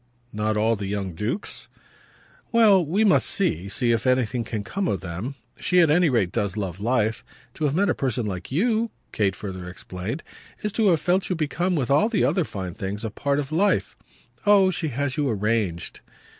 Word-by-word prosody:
"Not 105 0 0
all 110 +2 +2
the 100 -2 -5
young 100 -2 -3
dukes?" 105 - -4 0.8
"Well 215 -6 +6
we 180 +8 +1
must 205 - +4
see 100 - 0
see 120 +4 +1
if 115 +2 0
anything 125 -2 +1
can 110 -2 -4
come 195 - -2
of 95 - -1
them. 95 +9 -5 0.2
She 180 - +2
at 165 -4 +5
any 170 +1 +4
rate 110 -9 +1
does 105 -2 -1
love 95 -3 -3
life. 110 -1 0 0.3
To 155 - -2
have 145 0 +1
met 200 +3 +3
a 160 - +2
person 125 -4 -1
like 95 0 -5
you," 225 - +1 0.2
Kate 100 -3 0
further 95 -3 -6
explained, 95 - -6 0.4
"is 210 - -1
to 220 +1 +2
have 170 -4 +4
felt 180 +1 +1
you 185 - 0
become, 175 +3 0
with 140 -4 -1
all 150 +11 +4
the 225 - +1
other 180 -5 +2
fine 95 -7 -5
things, 100 +2 -4
a 110 - -3
part 140 +6 -1
of 145 0 -3
life. 195 +6 +1 0.5
Oh 200 -3 +5
she 170 -3 -2
has 140 +1 -2
you 145 -2 +1
arranged!" 105 -5 -1
125 Hz, 200 wpm, -24 LUFS, -, 0.8 s, Well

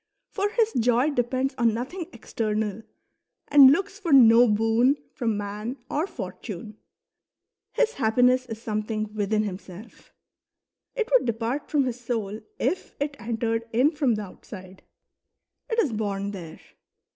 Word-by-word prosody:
For 405 0 -1
his 450 0 +1
joy 245 +5 +2
depends 255 +1 -1
on 230 -2 +3
nothing 320 +9 -5
external 215 -2 -3 0.7
and 280 -2 +9
looks 395 +6 -1
for 350 -6 -3
no 240 -2 +7
boon 225 +5 +3 0.2
from 225 -4 -1
man 210 +5 -5
or 310 +5 0
fortune. 210 - -8 1.0
His 475 -1 +1
happiness 250 +2 +2
is 225 -2 -6
something 215 -1 -3
within 215 0 0
himself; 195 +1 -9 0.8
it 460 -3 -1
would - - +4
depart 230 +5 -2
from 290 -2 +2
his 250 -1 -3
soul 220 -4 -3 0.2
if 370 - -2
it 285 0 -2
entered 230 0 -2
in 255 +7 +3
from 285 -7 +1
the 210 - -4
outside; 185 -1 -12 0.9
it 455 - -1
is 305 - +2
born 200 -2 -2
there. 170 -5 -9
230 Hz, 135 wpm, -25 LUFS, 215-275 Hz, 1.0 s, and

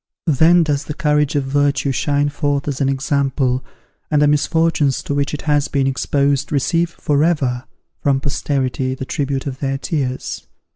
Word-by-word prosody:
Then 165 +5 +5
does 145 -2 -1
the 150 - -5
courage 150 -2 +1
of 145 - +1
virtue 140 +1 +1
shine 145 +2 +1
forth 145 -1 -1
as 145 -1 -2
an 135 - +2
example, 135 -2 0 0.5
and 150 - +2
the 150 - +4
misfortunes 150 -1 +1
to - - -3
which 140 0 0
it 150 - -5
has 145 -1 +1
been 140 -2 0
exposed 140 +2 0
receive 165 +4 +1
for 150 -3 0
ever, 135 -7 0 0.4
from 140 -2 +2
posterity, 135 -2 -1
the 130 - -6
tribute 140 -1 -2
of 135 -2 -5
their 135 -1 -1
tears. 135 -3 -3
140 Hz, 165 wpm, -19 LUFS, 135-150 Hz, 0.5 s, Then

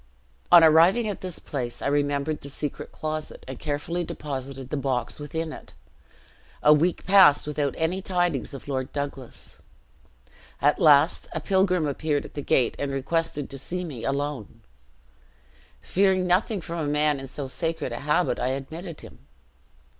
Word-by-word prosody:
"On 175 -1 +9
arriving 170 +9 +5
at 205 - -4
this 185 -3 -6
place, 125 -4 -5
I - - -6
remembered 145 +1 0
the 140 - -9
secret 145 +1 -5
closet, 155 0 -5
and 130 -1 -7
carefully 155 +4 -2
deposited 135 -4 -6
the - - 0
box 135 -1 -2
within 160 +2 -4
it. - - -12 0.9
A 150 - +8
week 165 +4 +1
passed, 190 -7 +6
without 145 -1 -1
any 170 +4 0
tidings 175 -5 -1
of 135 - -10
Lord 130 -2 -3
Douglas. 140 -3 -6 1.0
At 145 +1 +3
last 150 +1 +5
a 160 - -2
pilgrim 185 0 +2
appeared 145 0 -1
at - - -11
the 145 - -4
gate, 125 -3 +2
and 140 - -1
requested 150 +2 -1
to 135 - -4
see 180 +7 -4
me 135 -9 -7
alone; 140 -5 -3 1.2
fearing 190 -1 +2
nothing 185 +3 +1
from 170 0 -5
a 150 -2 -1
man 150 -1 +2
in 135 - -7
so 135 +1 -5
sacred 165 +4 -3
a - - -4
habit, 150 +5 +1
I - - 0
admitted 155 +6 -5
him. - - -13
150 Hz, 160 wpm, -25 LUFS, 140-170 Hz, 1.2 s, On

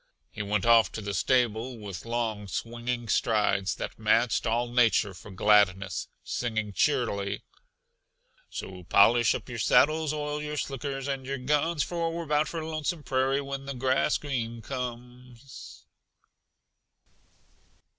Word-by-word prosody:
He - - -6
went 105 -1 -1
off 115 -4 +5
to 110 - -5
the 100 -1 -4
stable 120 +2 +1
with 100 -1 -8
long, 115 -3 -2
swinging 120 +3 -4
strides 105 -4 +1
that - - -6
matched 115 +2 +2
all 120 +2 +1
nature 115 -4 +3
for 90 +3 -12
gladness, 100 -1 +2 0.2
singing 110 -4 -2
cheerily: 100 -4 0 1.1
"So 90 -1 -7
polish 115 +6 +5
up - - -6
your 120 -2 -6
saddles, 155 - +3
oil 150 0 -3
your 150 0 -4
slickers 135 -1 -3
and 135 -1 -2
your 135 0 -2
guns, 150 +4 +1
For 170 -1 -2
we're 165 -1 -5
hound 150 0 +2
for 165 -2 -4
Lonesome 155 0 -3
Prairie 135 +1 +1
when 140 0 -6
the 140 - -4
green - - -9
grass 130 +3 +2 0.5
comes." 125 0 -8
120 Hz, 135 wpm, -28 LUFS, 105-140 Hz, 1.1 s, off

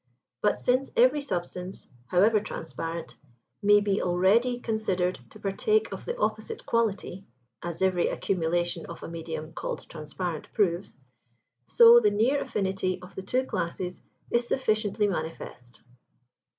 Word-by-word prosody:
But 210 - +2
since 255 +2 +1
every 255 +5 +5
substance, 180 -5 -4 0.2
however 210 +4 +4
transparent, 165 -4 -6 0.5
may 205 0 +6
be 200 -1 +1
already 205 +8 +3
considered 190 - -1
to - - -14
partake 425 - +1
of - - -7
the 475 - -3
opposite 220 - -2
quality 200 -4 -1 0.3
(as 170 +1 -3
every 185 -2 +2
accumulation 175 -2 -1
of - - -9
a - - -5
medium 160 -1 -6
called - - -5
transparent 160 +1 -5
proves), 185 -5 0 0.7
so 235 - +8
the 215 -3 +4
near 235 +8 +2
affinity 190 -2 -1
of 180 +2 -13
the - - -6
two 255 +7 0
classes 180 -2 -3 0.3
is 235 0 +2
sufficiently 215 -5 +1
manifest. 160 -9 -6
195 Hz, 130 wpm, -27 LUFS, 175-220 Hz, 0.7 s, so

